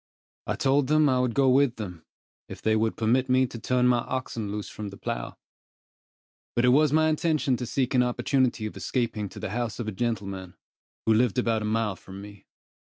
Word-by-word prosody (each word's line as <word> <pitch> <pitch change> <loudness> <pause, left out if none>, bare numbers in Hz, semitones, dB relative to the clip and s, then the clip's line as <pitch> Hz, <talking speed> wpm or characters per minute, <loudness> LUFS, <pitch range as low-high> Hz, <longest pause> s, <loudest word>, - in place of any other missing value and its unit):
I - - 0
told 135 0 +2
them 155 0 +4
I 130 -2 +2
would 125 -2 0
go 135 -1 +4
with 130 -1 +4
them, 90 -7 -8 0.4
if - - -8
they 110 0 +1
would 110 0 0
permit 125 +4 +1
me 130 +1 +4
to 120 -2 -8
turn 125 +2 +1
my 125 -1 +4
oxen 120 -4 -4
loose 105 0 -4
from 105 - -7
the 100 - -11
plough; - - -5 1.2
but 120 - +3
it - - +5
was 145 +3 +4
my 155 +1 +4
intention 155 -4 +1
to 125 - -5
seek 130 +2 -1
an 125 - +4
opportunity 125 -1 +1
of 110 - -6
escaping 115 -5 -2
to - - -10
the - - -4
house 120 0 -2
of 115 - -3
a - - -1
gentleman, 95 -4 -3 0.5
who 110 - +4
lived 120 0 +2
about 115 -3 +1
a - - -3
mile 110 -2 0
from 95 +1 -11
me. 100 0 -12
120 Hz, 210 wpm, -26 LUFS, 105-130 Hz, 1.2 s, it